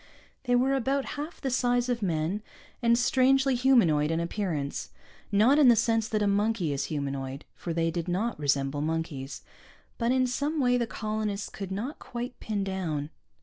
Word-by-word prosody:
They 245 -1 +3
were 260 +2 +3
about 270 +1 0
half 300 +4 -6
the 265 - -2
size 245 -1 +2
of 245 -2 -1
men, 175 +2 -1 0.4
and 235 -1 +4
strangely 265 +2 +3
humanoid 230 - +4
in 165 0 0
appearance, 170 -5 -3 0.4
not 225 +9 +5
in 285 - +7
the 240 - +8
sense 225 0 +1
that 215 -1 0
a - - +2
monkey 200 -5 +1
is 140 0 -2
humanoid 140 -2 -4
(for 170 - -6
they 165 0 0
did 170 0 -3
not 195 +5 -1
resemble 140 0 0
monkeys) 155 -3 -3 0.6
but 235 0 +1
in 255 0 +3
some 285 +5 -1
way 250 -2 +3
the 240 -1 0
colonists 215 -2 -3
could 195 -2 -7
not 230 +10 -4
quite 245 +1 -6
pin 210 -2 -2
down. 165 -6 -3
210 Hz, 175 wpm, -28 LUFS, 165-245 Hz, 0.6 s, the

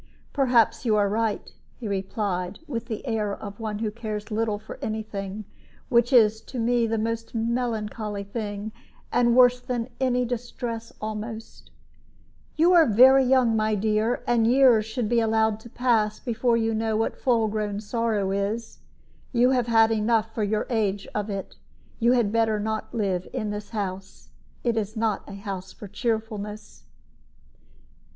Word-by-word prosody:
"Perhaps 240 -5 +3
you 225 -4 +2
are 205 -1 +3
right," 215 +1 -1 0.3
he 235 - -5
replied, 190 -1 -2
with 235 -6 -5
the 220 +1 -5
air 215 -4 -1
of 200 0 -9
one 215 -2 -3
who 215 0 -2
cares 215 -1 -6
little 215 -1 0
for 215 +1 -10
any 220 0 -2
thing, 200 0 -6 0.4
which 240 +1 +3
is 220 -3 +5
to 250 - -9
me 235 0 +2
the 225 0 -1
most 230 +1 -3
melancholy 225 -3 -2
thing, 205 0 -5 0.4
and 240 0 +3
worse 250 0 +6
than 250 -1 -3
any 250 -1 +1
distress 235 -1 -5
almost; 220 +1 -6 0.9
"you 335 +4 +4
are 330 -4 +6
very 260 +5 +7
young, 250 -3 +3
my 215 0 +1
dear, 215 +3 0
and 230 -2 +2
years 245 -4 +5
should 225 0 -2
be 235 +1 +2
allowed 220 -1 +2
to 235 - -13
pass 225 -4 +1
before 235 0 +1
you 225 0 0
know 220 0 0
what 225 - -1
full 235 -4 +2
grown 210 -1 -2
sorrow 215 -2 -1
is. 205 +4 -3 0.5
You 245 +1 +4
have 250 -3 +1
had 225 -1 +4
enough, 225 0 +1
for 220 - -3
your 210 +1 0
age, 205 -4 0
of 210 0 -2
it. 195 -1 -5 0.4
You 235 +1 +4
had 235 -5 +2
better 225 -1 +2
not 220 +1 -3
live 190 -5 -1
in 215 -5 -2
this 210 0 -6
house; 195 -3 -6 0.3
it 235 -2 0
is 215 +1 -2
not 220 -2 -1
a - - -8
house 195 -2 -6
for 205 - -10
cheerfulness." 215 -1 -4
220 Hz, 160 wpm, -25 LUFS, 210-235 Hz, 0.9 s, very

